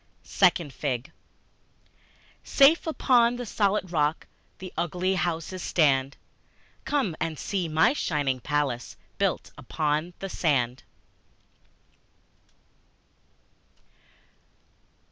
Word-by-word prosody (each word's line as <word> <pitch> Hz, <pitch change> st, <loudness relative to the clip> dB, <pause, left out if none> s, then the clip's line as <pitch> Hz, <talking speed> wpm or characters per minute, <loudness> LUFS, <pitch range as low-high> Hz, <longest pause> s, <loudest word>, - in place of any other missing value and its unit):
Second 170 Hz, -6 st, +2 dB
Fig 130 Hz, -2 st, -3 dB, 1.3 s
SAFE 295 Hz, +5 st, +4 dB
upon 245 Hz, -6 st, +3 dB
the 245 Hz, 0 st, -5 dB
solid 200 Hz, -3 st, 0 dB
rock 150 Hz, -2 st, 0 dB, 0.3 s
the 185 Hz, -1 st, -9 dB
ugly 180 Hz, +2 st, -1 dB
houses 175 Hz, 0 st, -2 dB
stand: 140 Hz, -5 st, +1 dB, 0.7 s
Come 265 Hz, -, 0 dB
and 160 Hz, -1 st, -3 dB
see 185 Hz, +1 st, -2 dB
my 160 Hz, -, +3 dB
shining 145 Hz, -, -1 dB
palace 140 Hz, -3 st, -2 dB, 0.2 s
built -, -, -1 dB
upon 155 Hz, +3 st, -2 dB
the 195 Hz, -, -5 dB
sand! 130 Hz, -9 st, 0 dB
165 Hz, 85 wpm, -26 LUFS, 145-195 Hz, 1.3 s, SAFE